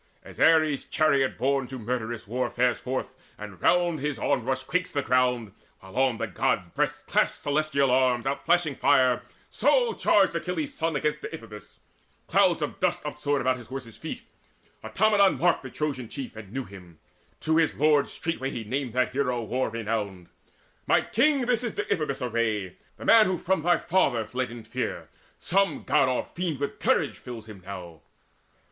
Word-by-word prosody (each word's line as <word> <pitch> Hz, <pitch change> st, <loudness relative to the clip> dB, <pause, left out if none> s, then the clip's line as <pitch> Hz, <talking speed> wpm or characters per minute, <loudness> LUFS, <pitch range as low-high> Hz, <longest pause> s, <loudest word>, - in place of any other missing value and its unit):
As -, -, -13 dB
Ares 155 Hz, -4 st, +4 dB
chariot 140 Hz, -4 st, +2 dB
borne 135 Hz, +1 st, 0 dB
to 130 Hz, -, -7 dB
murderous 120 Hz, -1 st, -4 dB
war 125 Hz, +5 st, -2 dB
Fares 125 Hz, -1 st, +1 dB
forth, 130 Hz, 0 st, -4 dB, 0.2 s
and 100 Hz, -5 st, -10 dB
round 175 Hz, -3 st, +3 dB
his 145 Hz, -1 st, -2 dB
onrush 130 Hz, +1 st, 0 dB
quakes 180 Hz, +1 st, -1 dB
the 140 Hz, -2 st, -1 dB
ground, 125 Hz, -5 st, +1 dB, 0.3 s
While 95 Hz, 0 st, -14 dB
on 130 Hz, -3 st, +2 dB
the -, -, -2 dB
God's -, -, 0 dB
breast -, -, -2 dB
clash -, -, +2 dB
celestial 145 Hz, -2 st, 0 dB
arms 125 Hz, -1 st, +2 dB
Outflashing 145 Hz, +2 st, +1 dB
fire, 130 Hz, -3 st, +4 dB, 0.3 s
so 485 Hz, -2 st, +2 dB
charged -, -, +3 dB
Achilles' 295 Hz, -2 st, -3 dB
son 165 Hz, -, -1 dB
Against 150 Hz, 0 st, -1 dB
Deiphobus. 115 Hz, -9 st, -9 dB, 0.5 s
Clouds -, -, +3 dB
of -, -, -4 dB
dust -, -, 0 dB
upsoared 145 Hz, -1 st, -1 dB
About 130 Hz, 0 st, +1 dB
his 120 Hz, -3 st, -12 dB
horses' 130 Hz, -4 st, -7 dB
feet. -, -, -7 dB, 0.6 s
Automedon 205 Hz, -2 st, +3 dB
marked 175 Hz, 0 st, +2 dB
The 130 Hz, -, -8 dB
Trojan 130 Hz, -5 st, -3 dB
chief, 135 Hz, -5 st, -7 dB
and 105 Hz, -3 st, -10 dB
knew 135 Hz, +2 st, -3 dB
him. 90 Hz, -6 st, -13 dB, 0.4 s
To 160 Hz, 0 st, +1 dB
his 165 Hz, -2 st, +2 dB
lord 150 Hz, -1 st, +3 dB
Straightway 160 Hz, -5 st, -3 dB
he 120 Hz, -4 st, -5 dB
named 125 Hz, +2 st, -3 dB
that 125 Hz, 0 st, +1 dB
hero 125 Hz, -3 st, -1 dB
war 125 Hz, +4 st, -1 dB
renowned: 105 Hz, -5 st, -4 dB, 0.6 s
"My -, -, +4 dB
king, 275 Hz, +4 st, +2 dB
this 245 Hz, -1 st, +1 dB
is 235 Hz, -, -2 dB
Deiphobus' 155 Hz, -, -2 dB
array 110 Hz, -6 st, -1 dB, 0.2 s
The -, -, -9 dB
man 225 Hz, -3 st, +7 dB
who 185 Hz, -1 st, 0 dB
from 190 Hz, +1 st, 0 dB
thy 175 Hz, +2 st, +3 dB
father 125 Hz, -11 st, +1 dB
fled 125 Hz, +3 st, -3 dB
in 115 Hz, -1 st, -9 dB
fear. 110 Hz, -, -4 dB, 0.3 s
Some 195 Hz, +2 st, +1 dB
God 130 Hz, -, +3 dB
or 130 Hz, -, -1 dB
fiend 170 Hz, -6 st, -4 dB
with 140 Hz, -, -4 dB
courage -, -, +1 dB
fills 115 Hz, -3 st, -8 dB
him 105 Hz, -3 st, -11 dB
now." 90 Hz, -4 st, -9 dB
130 Hz, 170 wpm, -26 LUFS, 115-155 Hz, 0.6 s, man